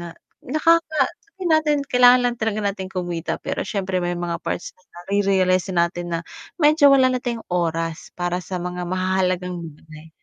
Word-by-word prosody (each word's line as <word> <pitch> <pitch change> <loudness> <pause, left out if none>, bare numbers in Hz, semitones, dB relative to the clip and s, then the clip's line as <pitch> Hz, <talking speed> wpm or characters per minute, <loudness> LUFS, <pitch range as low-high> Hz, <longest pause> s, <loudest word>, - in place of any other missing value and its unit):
na 175 - -7 0.3
nakaka 310 +1 +2 0.2
sabihin 380 -4 -6
natin 310 -1 +3
kailangan 250 -1 +6
lang 245 -1 0
talaga 220 -1 -1
natin 195 -2 -2
kumita. 175 -3 -3
Pero - - -2
siyempre 190 -3 -2
may 175 0 -2
mga 170 -1 -3
parts - - -4
din 185 - -33
nare-realize 190 0 +1
natin 175 0 0
na - - -3 0.4
medyo 300 -3 +5
wala 260 -2 +5
na 250 - -1
tayong 235 -2 -4
oras 165 -2 -2
para 175 0 -2
sa 180 +1 -6
mga 180 0 -4
mahahalagang 185 -1 -1 0.2
bagay. 155 0 -14
185 Hz, 165 wpm, -22 LUFS, 175-250 Hz, 0.4 s, kailangan